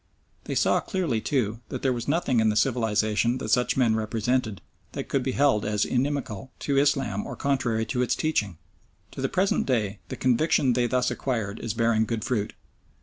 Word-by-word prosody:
They - - -3
saw - - +3
clearly, 165 - -1
too, 115 -6 -1
that - - -5
there 130 -2 +2
was 120 -1 -5
nothing 140 -5 +1
in 110 0 +3
the 105 - 0
civilisation 115 -1 +1
that 110 - -5
such 125 +2 +2
men 120 -4 +3
represented 110 0 -1 0.3
that - - -5
could 135 - +1
be 130 0 -2
held 135 -7 +3
as 105 0 0
inimical 130 -3 -2
to 140 -1 +1
Islam 135 -8 +1
or - - -6
contrary 125 -5 0
to 125 +1 -1
its 125 - +1
teaching. 105 - -1 0.5
To - - -7
the - - 0
present 190 +2 +1
day 105 -6 0
the - - -4
conviction 130 0 +2
they 120 0 +1
thus 125 +1 +1
acquired 115 -6 -3
is 115 -3 -4
bearing 115 -1 +2
good 115 -1 -3
fruit. 110 -5 -1
120 Hz, 190 wpm, -26 LUFS, 110-135 Hz, 0.5 s, saw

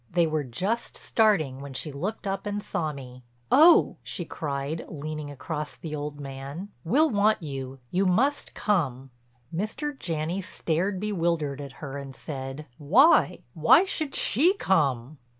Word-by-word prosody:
They 170 0 +3
were 155 -2 -1
just 190 - -2
starting 160 - +2
when 140 -1 -8
she 150 +3 -3
looked 190 +11 -4
up 195 +1 -2
and 205 0 -3
saw 160 -6 -2
me. 130 -3 -10 0.3
"Oh," 325 +4 +7
she 175 - -5
cried, 145 +1 -4
leaning 150 0 -5
across 150 +2 -4
the 155 -2 -6
old 145 0 -5
man, 140 +7 -7
"we'll 285 - +3
want 210 -2 +2
you—you 135 +5 -3
must 265 +11 +1
come." 135 - 0 0.4
Mr. 225 - -3
Janney 165 +3 -2
stared 185 +1 -1
bewildered 170 -8 -1
at 140 -2 -8
her 140 0 -5
and 135 -1 -8
said: 135 0 -6
"Why—why 265 - +5
should 310 -7 -2
she 330 - +3
come?" 145 - +1
160 Hz, 140 wpm, -27 LUFS, 140-205 Hz, 0.4 s, Oh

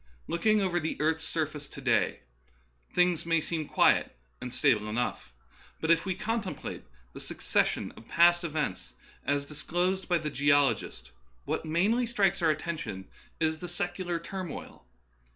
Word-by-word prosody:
Looking 215 +5 +2
over 175 -2 +1
the 160 -1 -3
earth's 160 +1 +1
surface 150 -2 -2
to - - -10
day, 125 -5 +1 0.7
things 180 -2 +2
may 165 0 +2
seem 155 -1 -3
quiet - - +3 0.2
and 125 - -5
stable 105 -3 +2
enough. 120 - -2 0.5
But 160 - +2
if 165 +2 +3
we 185 - 0
contemplate 220 -3 -3 0.3
the - - -8
succession - - 0
of 115 - -15
past 175 +1 +5
events, 95 - -3 0.3
as 140 0 +1
dis 150 +1 -3
closed 185 +3 0
by 175 - +4
the 155 -2 -3
geologist, 140 - +2 0.3
what - - -2
mainly 210 +10 +2
strikes 205 -7 +2
our 165 - +4
attention 155 - -3 0.3
is 160 -1 +1
the 180 - -6
secular 175 0 -2
turmoil. 170 - -7
165 Hz, 150 wpm, -29 LUFS, 145-175 Hz, 0.7 s, past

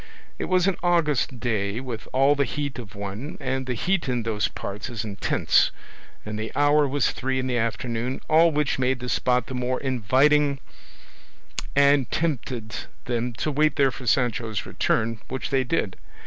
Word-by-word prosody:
It - - -1
was 185 -1 +2
an 195 -3 +1
August 150 -8 +1
day 105 -3 -1
with 125 -4 -6
all 135 +2 +4
the 140 -1 +2
heat 140 0 -3
of 105 -4 -9
one, 100 +8 -6
and 130 0 -2
the 125 - -1
heat 175 - 0
in 120 -2 0
those 110 -2 0
parts 100 +5 -6
is 115 -2 -4
intense, 100 -2 +2 0.6
and 105 0 -4
the 110 - -4
hour 145 0 +4
was 140 0 +1
three 130 0 -2
in 130 - -1
the 125 -2 0
afternoon, 115 +2 -2
all 165 +2 +6
which 150 -3 0
made 130 0 +1
the 125 0 -5
spot 125 -1 +1
the 130 - -7
more 125 0 -1
inviting 135 +3 +3 1.2
and 140 -2 +4
tempted 125 -8 -2 0.3
them 120 0 -1
to 150 +7 -2
wait 155 +2 +2
there 135 -2 +3
for 125 -1 -9
Sancho's 115 -5 +1
return, 115 0 0
which 130 - -4
they 135 -1 +3
did. 125 - -1
130 Hz, 175 wpm, -25 LUFS, 115-140 Hz, 1.2 s, all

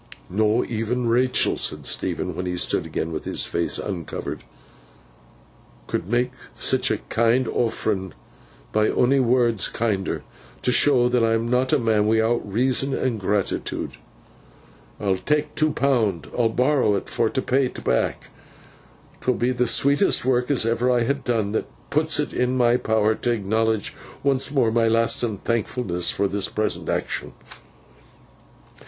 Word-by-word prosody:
'Not 110 +5 +1
e'en 115 +2 -1
Rachael,' 125 +2 +2
said - - -3
Stephen, - - -1
when 90 - -4
he 90 0 -2
stood - - +1
again 80 - -3
with 80 - -4
his - - 0
face 85 - -1
uncovered, 90 -5 -5 1.4
'could - - -3
mak 120 +2 +1 0.2
sitch - - +2
a - - +1
kind 115 +2 +2
offerin, 105 -5 -1 0.6
by 110 0 +2
onny 135 +3 +3
words, 120 -3 +2
kinder. 105 -4 -2 0.4
T' 125 - +2
show 125 -2 +4
that 125 -1 +2
I'm 115 0 +1
not 125 +2 +1
a 155 - +4
man 110 -4 +1
wi'out 110 +2 +2
reason 130 +4 +1
and 120 -4 -1
gratitude, 100 0 -2 1.1
I'll 95 -2 0
tak 150 +10 -1
two 155 0 +2
pound. 115 - 0
I'll 120 -2 +2
borrow 125 -4 +2
't - - -16
for - - 0
t' - - -2
pay 130 +1 +1
't - - -9
back. 60 - -1 0.9
'Twill 125 - +1
be 120 +2 +1
the 125 -1 0
sweetest 140 - +3
work 125 0 +1
as 135 -6 +2
ever 115 +2 +1
I 120 -1 +3
ha 130 +4 +1
done, 120 -7 -2
that 110 - -2 0.2
puts - - +2
it - - -2
in 125 +1 0
my 120 -1 +4
power 110 -2 +1
t' 120 - -3
acknowledge 110 -1 0 0.3
once 135 -1 +1
more 135 -6 +2
my 115 0 +2
lastin 115 -1 +1
thankfulness 110 -5 -1
for 100 - +1
this 100 0 -2
present 110 0 -2
action. - - -2
115 Hz, 150 wpm, -23 LUFS, 105-125 Hz, 1.4 s, show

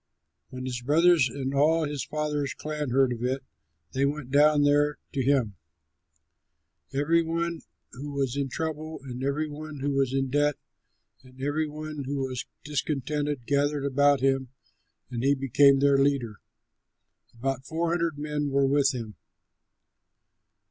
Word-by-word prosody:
When 130 0 -7
his 125 -1 -3
brothers 155 +1 +4
and 135 +1 -4
all 155 +4 +3
his 145 -2 -3
father's 150 -2 -2
clan 150 -2 -4
heard 130 0 +3
of 120 0 -6
it, 130 +2 -1 0.5
they 135 - 0
went 140 -2 -2
down 145 +1 +5
there 145 +1 +3 0.2
to 135 - 0
him. 130 -6 +1 1.3
Every 155 +5 +2
one 165 0 -2 0.3
who 140 +4 -7
was 140 -3 -1
in 140 -1 -1
trouble 155 +2 -4
and 130 -1 -6
every 145 +3 0
one 150 -1 -8
who 145 +1 0
was 135 -2 +1
in 135 -1 -1
debt, 145 0 +2 0.7
and 130 0 -17
every 145 +3 0
one 150 -1 -6
who 140 +2 -3
was 130 -2 -5 0.2
discontented 145 -2 -2
gathered 145 +1 +1
about 145 0 +3
him, 135 -1 +1 0.6
and 120 -1 -3
he 140 +1 +4
became 135 +1 +5
their 140 -1 +4
leader. 135 -6 +1 1.0
About 135 +2 -3
four 165 +1 -1
hundred 170 -3 0
men 150 -1 -2
were 140 0 +2
with 135 -1 +3
him. 110 -5 -6
140 Hz, 150 wpm, -27 LUFS, 135-150 Hz, 1.3 s, down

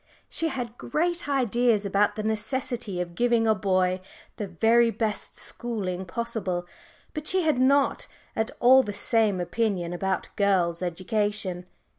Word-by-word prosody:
She 330 - -1
had 245 -5 -5
great 340 +4 -1
ideas 240 -5 +2
about 200 +1 +2
the 215 - -4
necessity 220 -2 -2
of 175 -1 -4
giving 235 +2 +2
a 220 - +4
boy 185 -2 +1 0.4
the 205 - -3
very 225 +6 +3
best 220 -2 -3
schooling 190 -6 -3
possible, 190 -3 -3 0.5
but 305 0 -5
she 375 0 +3
had 310 -5 +2
not 275 +2 +3 0.3
at 220 0 0
all 260 +2 +7
the 210 -5 -5
same 210 -2 +2
opinion 180 -1 -1
about 190 +1 -2
girls' 185 -5 +1
education. 185 0 -2
215 Hz, 140 wpm, -26 LUFS, 185-240 Hz, 0.5 s, all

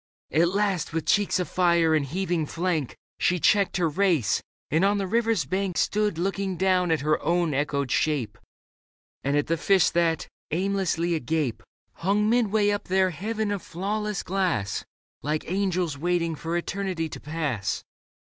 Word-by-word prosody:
At 165 +4 +3
last, 195 -5 0
with 165 -1 -2
cheeks 205 -3 +2
afire 170 -2 +2
and 155 -2 +3
heaving 170 +1 -1
flank, 165 -5 -2 0.2
She 180 0 +2
checked 200 +3 +3
her 175 -2 +2
race, 170 - +2 0.3
and 160 +5 +3
on 200 +1 +3
the 195 - -1
river's 225 - +1
bank 190 +3 -2
Stood 210 -4 +1
looking 195 +1 -1
down 185 -1 +2
at 160 -3 +1
her 155 +1 +1
own 170 -2 +1
echoed 140 -1 -1
shape 135 -9 0 0.8
And 140 +1 +1
at 145 - +1
the 165 - 0
fish 190 +3 +3
that, 165 -2 +1 0.2
aimlessly 180 -1 0
agape. 150 -4 -1 0.3
Hung 205 +4 +1
midway 215 -3 +3
up 205 - -2
their 190 0 +2
heaven 210 +5 -2
of 200 -2 -2
flawless 210 +3 -3
glass. 175 - -1 0.4
Like 150 +1 -2
angels 180 -6 0
waiting 170 0 0
for 165 +2 -3
eternity 185 -2 -2
to - - -8
pass. 145 -10 -2
175 Hz, 155 wpm, -26 LUFS, 155-195 Hz, 0.8 s, At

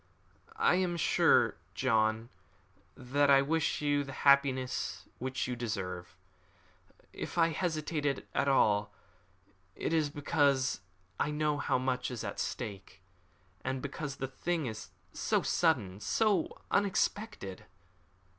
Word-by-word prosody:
"I 445 - +3
am 180 -2 0
sure, 155 - +4 0.2
John, 110 -2 +1 0.7
that 140 +3 +1
I 135 0 +7
wish 160 +1 0
you 145 -1 +2
the 135 -1 -8
happiness 140 -2 +2
which 130 +1 -2
you 125 - -2
deserve. 95 -7 -5 1.0
If - - -6
I 165 -1 +5
hesitated 155 -4 -1
at 140 - +1
all, 105 -6 +3 0.8
it - - -2
is 155 -3 +2
because 140 - +1 0.4
I - - +1
know 150 -1 0
how - - +1
much 130 0 -1
is 120 -4 -5
at 100 - -5
stake, 100 -5 -5 0.6
and 130 0 -2
because 140 +1 -5
the 135 - -4
thing 160 +4 -2
is 110 -3 -6 0.2
so - - 0
sudden, 110 - +1
so 205 - +1
unexpected." 200 - -1
135 Hz, 120 wpm, -32 LUFS, 120-155 Hz, 1.0 s, I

